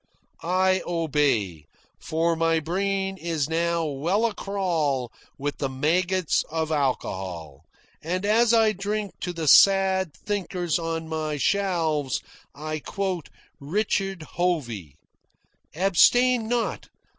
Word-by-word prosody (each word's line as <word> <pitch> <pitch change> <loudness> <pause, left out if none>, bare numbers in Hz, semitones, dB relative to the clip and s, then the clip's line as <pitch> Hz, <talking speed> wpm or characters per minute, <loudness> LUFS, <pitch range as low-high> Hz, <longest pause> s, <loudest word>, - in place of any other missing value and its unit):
I 185 +2 +2
obey, 140 - 0 0.3
for 165 +1 0
my 165 0 +2
brain 195 +4 -1
is 165 -5 -2
now 170 +1 0
well 165 +10 0
a 230 - 0
crawl 160 - -1 0.3
with 145 +1 -4
the 135 - -1
maggots 175 +6 +1
of 160 0 -2
alcohol, 95 - -3 0.4
and 180 +5 -2
as 225 +2 +4
I 225 -2 +5
drink 205 0 -3
to 180 - -3
the 165 -3 -4
sad 190 0 +5
thinkers 180 -5 -2
on 165 -1 -3
my 155 -1 -3
shelves 165 -6 0 0.4
I 155 +1 -4
quote 185 0 -3 0.3
Richard 195 +2 -1
Hovey: 125 - -2 0.8
"Abstain 225 +7 +4
not! 235 0 -2
170 Hz, 110 wpm, -25 LUFS, 150-195 Hz, 0.8 s, I